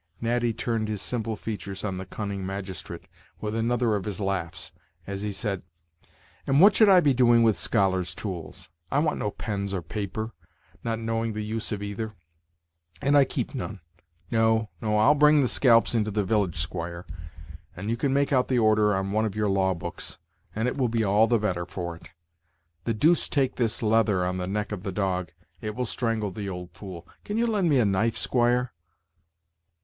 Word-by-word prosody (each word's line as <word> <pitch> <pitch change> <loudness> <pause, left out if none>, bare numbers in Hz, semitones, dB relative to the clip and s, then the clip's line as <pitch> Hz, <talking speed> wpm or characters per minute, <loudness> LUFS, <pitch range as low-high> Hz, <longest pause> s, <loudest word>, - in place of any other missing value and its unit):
Natty 120 0 +1
turned 115 -1 -2
his 105 -1 -3
simple 115 +1 -2
features 100 -3 -6
on 95 -3 -2
the 95 - -7
cunning 100 -1 -4
magistrate 95 -1 -6 0.4
with 105 0 -3
another 115 0 +1
of 100 - -3
his 105 -2 -4
laughs, 95 -4 -3 0.3
as 100 0 -5
he 105 0 -2
said: 100 -1 -2 0.9
"And 135 +1 +4
what 195 +3 +7
should 215 -2 +6
I 185 -2 +7
be 145 -4 +4
doing 120 -2 +5
with 110 -3 +4
scholars' 95 0 +1
tools? 90 -9 -6 0.2
I 135 - 0
want 150 +1 +1
no 105 - -1
pens 100 -1 -3
or 90 - -3
paper, 105 +4 -4 0.5
not 115 -1 -1
knowing 115 0 -2
the 105 0 -3
use 110 +1 -3
of 105 -1 -3
either; 105 +2 -4 0.9
and 140 +7 +2
I 140 -1 +7
keep - - -3
none. 110 -6 -5 0.5
No, 110 -1 +2
no, 105 -1 +1
I'll 110 +7 +6
bring 150 0 +5
the 130 - +2
scalps 115 -2 +4
into 110 -2 +1
the 105 0 0
village, 95 -4 0
squire, 85 +2 -4 0.7
and 100 +5 -4
you - - +1
can 135 +3 0
make 140 +1 +2
out 125 -1 +3
the 130 - +1
order 110 -2 +4
on 95 +1 -2
one 110 +2 +1
of 105 -2 -3
your 105 -1 +1
law 95 -1 +2
books, 85 - -6 0.4
and 110 +3 0
it 125 - -2
will 130 -3 +1
be 115 0 +1
all 105 +2 +4
the 120 - +3
better 90 -5 -1
for 85 -2 -5
it. - - -15 0.8
The 115 - 0
deuce 160 +9 +3
take 135 -3 0
this 115 -2 0
leather 105 -4 +3
on 90 0 -1
the 90 0 -3
neck 105 +2 -2
of 105 -3 -4
the 100 0 -4
dog, 90 -2 -1 0.3
it 105 -1 -4
will 125 - -1
strangle 115 -4 -1
the 100 +1 -5
old 90 -1 -6
fool. 90 -4 -9 0.2
Can 210 - -3
you 235 - +2
lend 205 -7 +1
me 145 - +4
a 120 - +4
knife, 110 +3 +1
squire?" 125 +1 +2
110 Hz, 195 wpm, -26 LUFS, 95-120 Hz, 0.9 s, what